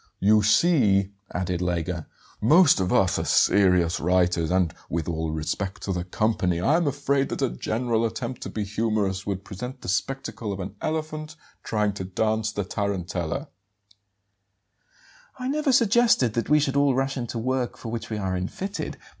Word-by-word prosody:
"You 105 +2 +5
see," 105 - +3 0.2
added 90 -1 -2
Lega, 85 -2 -2 0.3
"most 155 - +6
of 90 -1 0
us - - +3
are - - -1
serious 90 -4 +3
writers; 90 -2 +2
and, 90 -3 +1 0.2
with 80 -2 -2
all 80 -1 -2
respect 80 +5 -3
to 95 - -1
the 90 -1 -2
company, 90 -3 0
I 135 - +3
am 170 -2 +2
afraid 140 0 0
that - - -2
a - - +1
general 115 - -1
attempt 115 +2 -3
to - - -5
be 105 - -3
humorous 105 -2 -1
would 100 -1 -3
present 125 +6 -7
the - - -9
spectacle 110 +2 -2
of 100 - -5
an 95 +2 -6
elephant 155 0 -3 0.3
trying 105 -2 0
to 100 - -5
dance 110 +3 0
the 105 - -2
tarantella." 90 -4 -3 1.9
"I 255 -1 -4
never 295 +1 +1
suggested 230 - +4
that 115 - -2
we 150 0 +5
should 140 -2 0
all 140 -2 +3
rush 135 +1 0
into 120 -2 -4
work 125 +1 -1
for 115 - -7
which 115 -1 -5
we 110 - -3
are 95 -2 -2
unfitted. 185 - -4
105 Hz, 170 wpm, -25 LUFS, 90-135 Hz, 1.9 s, most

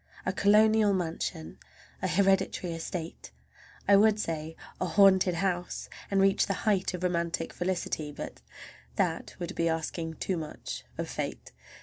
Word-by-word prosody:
A 185 - 0
colonial 210 +1 +5
mansion, 160 - -3 0.4
a - - 0
hereditary 190 -2 +2
estate, 165 0 -6 0.6
I 200 - +7
would 210 +1 +5
say 160 -4 -3 0.2
a 185 - 0
haunted 190 -1 +5
house, 180 -1 -2 0.2
and 195 - +2
reach 195 0 +4
the 195 - 0
height 195 -4 +2
of 180 - -7
romantic 170 -2 -1
felicity—but 170 -5 -3 0.5
that - - -1
would 175 +2 -5
be 165 0 +1
asking 160 0 -3
too 185 +2 -2
much 155 -2 -6
of - - -3
fate! - - -5
180 Hz, 135 wpm, -29 LUFS, 165-195 Hz, 0.6 s, I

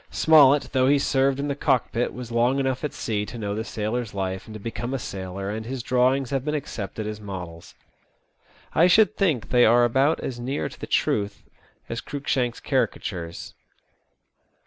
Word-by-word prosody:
Smollett, 145 -3 +5
though 130 -1 +3
he 145 +1 +5
served 135 -1 +1
in 145 - -1
the 140 - 0
cockpit, 125 -4 0
was 125 -1 -8
long 120 +3 +2
enough 135 0 -1
at 150 - -1
sea 105 -2 -2
to 120 - -8
know 100 -3 -3
the 110 - -2
sailor^s 110 0 -3
life 95 -1 -3
and 110 - -9
to - - -7
become 120 +4 -4
a - - 0
sailor, 95 -3 -5
and 110 +1 -4
his 125 +1 -5
drawings 130 +1 +2
have 135 -2 0
been 150 +1 -1
accepted 110 -7 -5
as 105 0 -5
models. 90 -5 -8 1.0
I 170 - +5
should 215 +3 +5
think 160 - 0
they 125 -1 +5
are 120 +2 +6
about 135 +6 +2
as 125 -2 -5
near 130 +4 -2
to - - -14
the - - -6
truth 100 0 0 0.4
as 115 - -4
Cruikshank's 130 -4 -2
caricatures. 85 -1 -2
120 Hz, 180 wpm, -24 LUFS, 105-135 Hz, 1.0 s, are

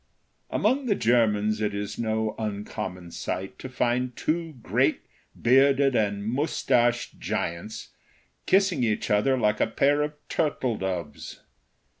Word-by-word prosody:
Among 265 0 +1
the 205 - +3
Germans 110 - +2
it 105 -1 -1
is 100 0 -4
no 110 -1 0
uncommon 100 -4 -5
sight 95 +3 -5
to 130 - -7
find 125 0 0
two 165 0 -2
great, - - +1 0.4
bearded 135 +2 +4
and 100 -2 0
mustached 120 -2 +1
giants, 85 +6 -4 0.6
kissing 190 -8 +3
each 110 -2 0
other 120 +6 +3
like 105 -3 +1
a - - +3
pair 140 +6 +2
of 150 0 -1
turtle 135 -6 0
doves. 90 -6 -5
115 Hz, 125 wpm, -26 LUFS, 105-135 Hz, 0.6 s, bearded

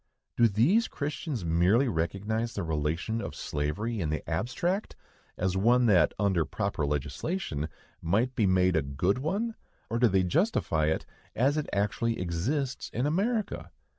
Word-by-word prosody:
Do 120 - +5
these 135 - +3
Christians 145 - -4
merely 90 +11 +3
recognize 105 +6 -1
the 100 - -2
relation 80 +8 -1
of - - -6
slavery, 90 +10 -2
in 80 - -1
the 75 - -3
abstract, 130 - -1 0.4
as 95 0 0
one 120 +6 +4
that, 90 -8 +4
under 95 -5 +2
proper 75 0 -2
legislation, 75 - -2 0.3
might 110 +10 +1
be 110 -6 +2
made 95 -1 +3
a 80 - +3
good 70 - 0
one, 200 - -1 0.4
or 115 - 0
do 120 - +6
they 95 -2 +2
justify 90 - +1
it 80 - 0 0.3
as 135 +5 +2
it 155 -1 -2
actually 115 +3 0
exists 120 - -2
in 120 +4 -1
America? 205 +7 -1
105 Hz, 150 wpm, -29 LUFS, 85-130 Hz, 0.4 s, do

